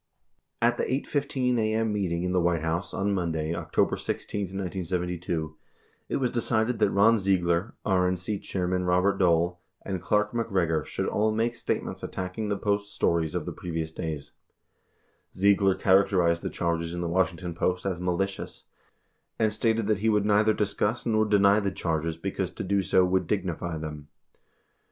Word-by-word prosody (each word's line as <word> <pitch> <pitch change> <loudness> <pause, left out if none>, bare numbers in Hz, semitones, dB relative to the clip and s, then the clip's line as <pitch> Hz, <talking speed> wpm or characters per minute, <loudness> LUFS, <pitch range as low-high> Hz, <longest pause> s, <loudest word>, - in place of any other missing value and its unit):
96 - - +6
At 120 +1 0
the - - -1
8 140 - -3
:15 130 -4 0
a.m. 110 0 +1
meeting 90 -4 -1
in 90 - -1
the 90 -1 +2
White 85 -2 +1
House, 85 +3 -2
on 100 +1 0
Monday, 80 -3 -1
October - - 0
16, 100 -1 -3
1972, 90 -3 -3 0.5
it - - -1
was 125 -3 0
decided 115 0 0
that - - +4
Ron 105 +3 +4
Ziegler, 95 +1 +1
RNC 95 +1 0
Chairman 90 -1 -1
Robert 90 +2 +2
Dole, 90 -1 +2 0.2
and 95 -3 -3
Clark 105 +3 +1
MacGregor 95 -9 0
should - - -3
all 110 +1 +1
make 115 +2 0
statements 115 - -3
attacking 95 +4 -4
the 100 - 0
Post's 100 0 -1
stories 80 -2 0
of - - -2
the - - -4
previous 80 -2 -4
days, 80 -3 -5 1.0
Ziegler 100 0 +4
characterized 95 -3 +3
the - - -3
charges 85 0 -2
in 85 - -3
the 85 - -1
Washington 90 0 0
Post 90 +2 -1
as 90 -3 -2
"malicious," 95 +2 -2 0.7
and 110 -2 +1
stated 110 0 +1
that 105 -1 +1
he 110 +2 +2
would 105 -2 +2
neither 105 +1 +4
dis 105 -1 0
cuss 110 +4 -1
nor 110 -2 +2
deny 100 -1 +4
the 100 -2 0
charges 80 -3 -2
because 80 - -3
to - - -6
do 100 +1 +1
so 95 -1 +3
would 95 +1 +1
"dignify" 90 -4 -2
them. 75 -2 -7
95 Hz, 170 wpm, -27 LUFS, 85-105 Hz, 1.0 s, 96